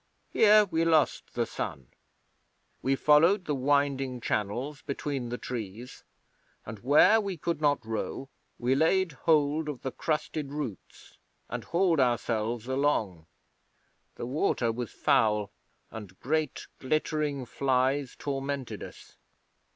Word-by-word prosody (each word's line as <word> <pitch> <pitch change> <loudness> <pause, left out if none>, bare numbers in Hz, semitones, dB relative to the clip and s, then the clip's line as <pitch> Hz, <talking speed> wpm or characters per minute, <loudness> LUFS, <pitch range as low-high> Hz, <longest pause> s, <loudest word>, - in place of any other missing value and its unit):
Here 215 -1 +6
we 165 -4 0
lost 160 -5 +1
the - - +1
sun. 65 -4 -6 0.9
We 135 +1 +1
followed 165 +8 +4
the 150 - -1
winding 135 -1 +1
channels 120 +7 -2
between 140 -3 -4
the 120 - -3
trees, 115 0 -7 0.6
and 105 0 -8
where 155 - +5
we 195 -3 -4
could 165 0 -3
not 145 -5 +2
row 115 +4 -4 0.3
we 125 +2 +1
laid 165 +5 +2
hold 150 +1 +1
of 140 -4 -6
the 130 - -2
crusted 150 -1 -3
roots 140 - -7 0.3
and - - -5
hauled 170 -2 +2
ourselves 120 -2 0
along. 115 - 0 0.9
The - - -5
water 125 -3 0
was 120 0 -4
foul, 105 -6 +2 0.4
and 100 -5 -10
great 155 +1 -1
glittering 150 -1 -1
flies 130 +1 0
tormented 135 -2 -4
us. - - -11
135 Hz, 120 wpm, -28 LUFS, 120-155 Hz, 0.9 s, Here